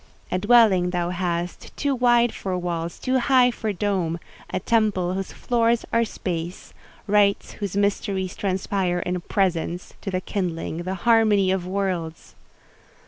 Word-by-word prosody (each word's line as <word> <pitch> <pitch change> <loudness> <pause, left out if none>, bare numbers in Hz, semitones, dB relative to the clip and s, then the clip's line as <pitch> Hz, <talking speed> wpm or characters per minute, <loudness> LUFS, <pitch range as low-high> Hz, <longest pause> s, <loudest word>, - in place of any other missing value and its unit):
A 185 - +1
dwelling 205 -4 +5
thou 175 -1 -1
hast, 175 -1 -3
too 285 -1 0
wide 240 -2 +3
for 185 -2 -3
walls, 170 -1 -3
too 255 0 0
high 250 -1 +4
for 220 -2 -3
dome—a 185 -4 -3
temple 205 -6 +1
whose 195 0 -4
floors 235 -1 +1
are 230 - +4
space—rites 200 +2 -2
whose 200 -2 -4
mysteries 195 -2 0
transpire 190 -2 -1
in 180 0 -2
presence, 180 -2 -1
to - - -4
the 185 -1 -1
kindling, 175 -4 -3
the 185 +2 -3
harmony 215 -5 +4
of 185 -2 -1
worlds! 185 -4 -3
190 Hz, 135 wpm, -24 LUFS, 180-215 Hz, -, dwelling